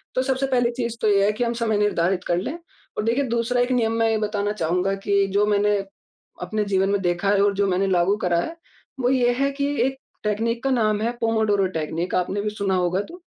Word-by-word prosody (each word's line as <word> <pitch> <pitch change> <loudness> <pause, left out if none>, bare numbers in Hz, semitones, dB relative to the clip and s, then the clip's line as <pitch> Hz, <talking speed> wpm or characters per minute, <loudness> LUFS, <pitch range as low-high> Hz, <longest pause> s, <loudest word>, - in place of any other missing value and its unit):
तो 255 - +2
सबसे 265 0 0
पहली 245 -2 +1
चीज़ 235 -1 -4
तो 215 - +2
ये 200 -1 +4
है 210 - +3
कि 230 +3 -2
हम 235 0 0
समय 220 -2 +1
निर्धारित 185 -3 +1
कर 175 - +1
लें, 275 - -3 0.4
और - - 0
देखिए, 240 +5 +1
दूसरा 235 0 0
एक 245 +1 0
नियम 225 -2 +1
मैं 225 0 +3
ये 220 - +1
बताना 210 -1 -1
चाहूँगा 180 +1 0
कि 200 -1 +3
जो 205 +1 +3
मैंने 205 0 +2 0.7
अपने 215 -1 -1
जीवन 195 -1 +1
में 200 - +1
देखा 175 +2 0
है 200 -1 +3
और 205 -1 +2
जो 200 +1 +1
मैंने 185 +1 +1
लागू 185 +2 +2
करा 175 -1 +2
है, 330 - -5 0.4
वो 245 0 +2
ये 245 -2 +3
है 275 - +2
कि 280 0 -1 0.2
एक 265 0 -3 0.3
टेकनीक 225 +3 -1
का 270 - +1
नाम 215 -4 +1
है, 235 +2 0
पोमोडोरो 220 -3 +2
टेकनीक। 165 +3 -3
आपने 185 +3 0
भी 210 - -1
सुना 200 -2 -1
होगा 180 +1 +1
तो। 355 +2 -11
210 Hz, 235 wpm, -23 LUFS, 195-235 Hz, 0.7 s, ये